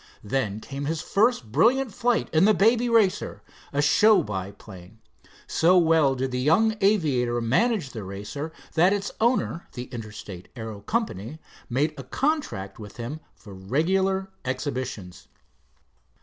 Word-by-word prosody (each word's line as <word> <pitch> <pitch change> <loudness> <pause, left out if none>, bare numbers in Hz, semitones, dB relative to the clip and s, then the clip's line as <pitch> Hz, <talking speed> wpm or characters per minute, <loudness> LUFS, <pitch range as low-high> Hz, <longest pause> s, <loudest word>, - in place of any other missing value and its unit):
Then 105 -2 -1
came 140 +5 -6
his 160 +2 -1
first 205 - +1
brilliant 235 - +3
flight 240 +2 +1
in 160 +4 +5
the 215 0 +5
Baby 230 +4 +3
Racer, 220 -5 +1 0.3
a 145 +1 +1
show 210 +8 +5
biplane. 95 0 -8 0.5
So 180 +3 +3
well 160 -5 +4
did 130 0 -2
the 125 - -2
young 185 +12 +3
aviator 140 - +2
manage 140 - +1
the 110 -4 -6
Racer, 105 +11 -6 0.2
that 175 +4 +4
its 200 -1 -2
owner, 235 -7 +1
the 125 - -5
Interstate 105 -5 -8
Aero 110 -3 -6
Company, 150 - -3 0.3
made 145 +6 +1
a - - -6
contract 130 - -2
with 105 -2 -10
him 125 +6 -5 0.2
for 100 - -13
regular 190 - 0
exhibitions. 130 - -4
140 Hz, 135 wpm, -25 LUFS, -, 0.5 s, in